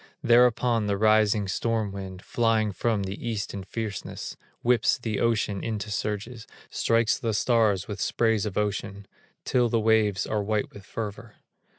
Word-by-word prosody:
Thereupon 120 -2 +4
the 100 -1 0
rising 110 -1 +3
storm 110 +1 -1
wind 95 -1 -7
Flying 115 -2 +1
from 105 +2 0
the 95 +1 -6
East 110 -4 -3
in 100 -1 -5
fierceness, 105 -1 -5 0.3
Whips 120 -2 +3
the 110 -4 -3
ocean 110 -4 0
into 105 -2 -3
surges, 105 +3 -4 0.2
Strikes 115 -1 +2
the 115 -5 -1
stars 105 -5 +2
with 105 -2 -5
sprays 110 -2 +1
of 100 - -5
ocean 100 -1 -2 0.4
Till 125 -2 +2
the 115 - +2
waves 110 -3 +2
are 105 -1 -1
white 105 +1 -1
with 100 -2 -12
fervor. 105 0 -6
110 Hz, 155 wpm, -26 LUFS, 100-115 Hz, 0.4 s, Thereupon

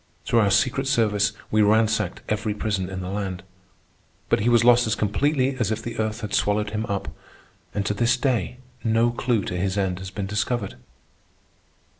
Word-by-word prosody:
Through 115 - +3
our 105 -2 +3
secret 130 +6 +2
service 105 -6 +2 0.2
we 110 - +3
ransacked 110 -2 +2
every 105 0 -1
prison 100 -3 -2
in 95 -1 -5
the 90 - -5
land. 95 -2 -4 0.9
But - - +3
he 110 +4 +1
was 120 -1 +4
lost 120 0 +5
as 110 - +1
completely 135 +5 +1
as 115 -5 0
if 110 0 -2
the 120 -1 -6
earth 110 +1 -2
had 105 -2 -5
swallowed 105 0 +1
him 110 +1 -3
up, 100 -1 -3 0.7
and 100 -1 -1
to 105 - 0
this 120 +4 +2
day 125 -4 -1 0.3
no 115 +1 +2
clew 120 -3 0
to 90 - -4
his 95 +2 -1
end 95 -2 0
has 95 0 -7
been 95 +1 -4
discovered. 105 +1 -2
105 Hz, 185 wpm, -24 LUFS, 100-120 Hz, 0.9 s, lost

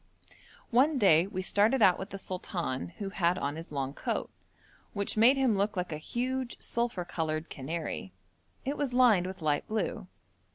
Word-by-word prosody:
One 270 +5 +4
day 185 -6 +5
we 185 -1 -4
started 215 +6 +3
out 185 -3 +5
with 190 - -6
the 195 - -6
sultan, 180 -7 -3
who 200 -3 -4
had 180 -2 +1
on 145 -3 -2
his 165 0 -8
long 135 -1 -2
coat, - - -3 0.6
which 200 -1 -2
made 235 +5 +6
him 260 -5 +3
look 200 +1 0
like 180 -1 -2
a 155 - -4
huge, 255 +7 -3
sulphur 235 -7 -1
coloured 155 -1 -3
canary. 165 +8 -4 0.5
It 280 +2 -2
was 270 -4 -2
lined 225 -8 +5
with 185 -3 -7
light 145 -1 +1
blue. 215 -2 -2
195 Hz, 170 wpm, -30 LUFS, 165-235 Hz, 0.6 s, made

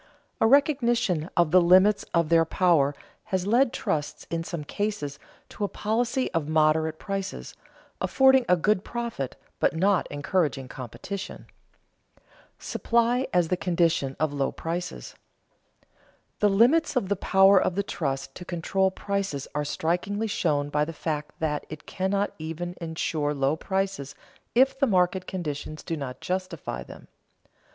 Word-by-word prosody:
A 225 - +4
recognition 240 - +2
of 170 -3 +3
the 185 +1 +7
limits 185 +4 +5
of 170 -2 +1
their 165 -1 +5
power 165 -5 +2 0.3
has 190 -1 -1
led 240 +4 +3
trusts 150 -1 -3
in 165 0 -1
some 165 -2 -5
cases 150 -5 -3 0.3
to - - -6
a - - +2
policy 230 +6 -1
of 165 -4 -1
moderate 155 0 +2
prices, 195 0 -5 0.5
affording 265 -1 +5
a 180 - +5
good 205 +3 +1
profit, 235 - -4 0.2
but - - +2
not 190 +2 +2
encouraging 145 -2 -1
competition. 135 - -7
[Sidenote: - - -35 0.3
Supply 235 +2 +1
as 175 -2 +2
the 180 - +2
condition 165 -7 +1
of 155 -1 0
low 140 -1 0
prices] 175 +2 -5 1.3
The 210 - +4
limits 255 +11 +4
of 245 -7 +1
the 200 - +1
power 195 0 +5
of 180 - 0
the 200 - 0
trust 135 -8 -3
to 180 - -9
control 180 +2 0
prices 195 -7 -3
are 150 - -1
strikingly 175 +8 -1
shown 150 -8 0
by 150 0 +1
the 165 +2 -4
fact 150 -2 -4
that 150 -2 -1
it 150 0 -9
cannot 195 +2 -1
even 165 +3 -5
insure 160 -2 -2
low 135 +2 +1
prices 190 -5 -3 0.4
if 265 +2 +4
the 275 - +3
market 185 -2 +1
conditions 155 -4 -5
do 165 - -3
not 135 -4 -6
justify 180 - -4
them. - - -12
175 Hz, 145 wpm, -26 LUFS, 155-200 Hz, 1.3 s, the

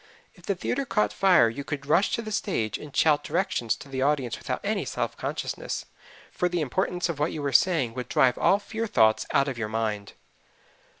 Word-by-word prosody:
If 180 -3 -18
the 200 - +1
theater 250 +9 -2
caught 210 -5 0
fire 185 -10 +5
you 120 +5 -4
could 140 -1 -5
rush 170 +7 +3
to 230 - -4
the 215 - -6
stage 145 - -1
and 150 -2 -11
shout 150 -2 +4
directions 170 - 0
to - - -12
the 135 -1 -4
audience 135 -4 +1
without - - -4
any - - -1
self - - -3
consciousness, - - -4 0.5
for 180 - 0
the 175 0 -1
importance 180 +4 -1
of 165 -4 -4
what 150 +2 +1
you 150 - -5
were 140 -1 -1
saying 150 -8 +3
would 125 0 -6
drive 125 -2 +3
all 195 - +4
fear 220 +2 -4
thoughts 110 - +3
out 140 0 +3
of 130 -4 -4
your 110 -2 -2
mind. 110 -2 -3
150 Hz, 205 wpm, -26 LUFS, 125-185 Hz, 0.5 s, fire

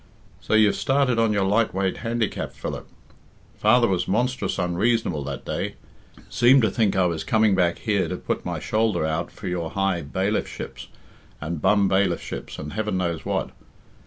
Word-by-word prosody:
"So - - 0
you've 110 -2 +5
started 135 -3 +1
on 115 -1 +3
your 100 -2 +1
light 105 +2 +1
weight 95 -1 0
handicap, 115 -2 -2
Philip. - - -6 0.7
Father 120 +3 +4
was 90 -3 0
monstrous 120 -1 0
unreasonable 90 -2 0
that 70 -1 -6
day. - - -3 0.5
Seemed 125 +1 +5
to 110 - +2
think 105 -2 +1
I 95 -1 +3
was 85 -2 -1
coming 110 -2 +3
back 90 -2 +2
here 105 -4 0
to - - -4
put - - -3
my - - -3
shoulder 110 -6 0
out 80 +2 -2
for 100 - -8
your 90 -2 -2
high 95 -2 0
bailiffships 95 +8 -3 0.5
and 80 0 -4
bum 100 -2 +4
bailiffships 95 +1 -1
and 75 0 -6
heaven 105 -2 -1
knows 85 -3 -2
what. - - -2
100 Hz, 165 wpm, -24 LUFS, 90-110 Hz, 0.7 s, you've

